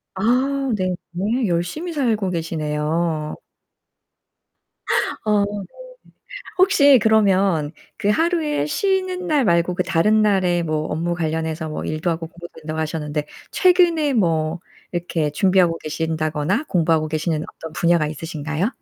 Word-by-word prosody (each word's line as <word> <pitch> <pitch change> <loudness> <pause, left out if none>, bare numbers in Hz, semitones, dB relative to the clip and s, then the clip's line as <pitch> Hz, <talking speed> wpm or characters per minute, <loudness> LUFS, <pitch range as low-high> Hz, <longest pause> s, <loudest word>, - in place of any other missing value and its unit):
아 190 - -4 0.5
네 185 -2 -1 0.2
네. 215 +7 0
열심히 180 - -2
살고 225 - 0
계시네요. 155 -1 -2 1.9
어 210 -1 +3
네. 205 -1 -5 0.9
혹시 285 -9 +6
그러면 195 -8 +3 0.3
그 205 - 0
하루에 320 - +1
쉬는 370 - -1
날 295 -5 +2
말고 170 -1 +2
그 180 - 0
다른 210 +7 +3
날에 185 -4 +2
뭐 155 -2 -1
업무 170 +2 -1
관련해서 160 -1 -2
뭐 155 - -5
일도 155 +3 -2
하고 165 0 -2
공부도 175 +1 -11
된다고 155 0 -5
하셨는데 150 -1 -3 0.2
최근에 345 -5 +3
뭐 165 -6 +1 0.3
이렇게 170 -3 -1
준비하고 180 0 +3
계신다거나 160 - -2
공부하고 160 - +2
계시는 155 0 -1
어떤 160 -1 -9
분야가 170 -2 +2
있으신가요? 160 - -3
175 Hz, 280 characters per minute, -21 LUFS, 160-215 Hz, 1.9 s, 혹시